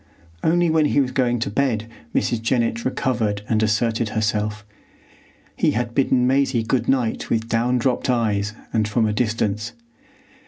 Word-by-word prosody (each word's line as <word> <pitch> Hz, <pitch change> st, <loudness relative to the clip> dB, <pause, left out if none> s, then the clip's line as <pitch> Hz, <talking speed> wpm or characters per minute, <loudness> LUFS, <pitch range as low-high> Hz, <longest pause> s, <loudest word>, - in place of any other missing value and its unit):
Only 175 Hz, +2 st, +3 dB
when 160 Hz, -1 st, +3 dB
he 145 Hz, -, +2 dB
was 130 Hz, -2 st, +1 dB
going 125 Hz, -2 st, +1 dB
to 115 Hz, -, -2 dB
bed 115 Hz, -3 st, 0 dB, 0.3 s
Mrs. 120 Hz, -2 st, 0 dB
Jennett 115 Hz, -1 st, 0 dB
recovered 110 Hz, -6 st, -1 dB
and 110 Hz, -1 st, +1 dB
asserted 110 Hz, +1 st, +1 dB
herself. 105 Hz, -1 st, -1 dB, 0.9 s
He -, -, +2 dB
had 120 Hz, -1 st, -2 dB
bidden 130 Hz, -2 st, +2 dB
Maisie 130 Hz, -2 st, +2 dB
good 125 Hz, +3 st, 0 dB
night 125 Hz, -4 st, 0 dB
with 115 Hz, -1 st, 0 dB
down 120 Hz, +2 st, +1 dB
dropped 125 Hz, +2 st, 0 dB
eyes 105 Hz, -4 st, 0 dB, 0.2 s
and 110 Hz, -2 st, +1 dB
from 110 Hz, +2 st, +1 dB
a 105 Hz, -, 0 dB
distance. 110 Hz, 0 st, -1 dB
115 Hz, 155 wpm, -22 LUFS, 110-125 Hz, 0.9 s, Only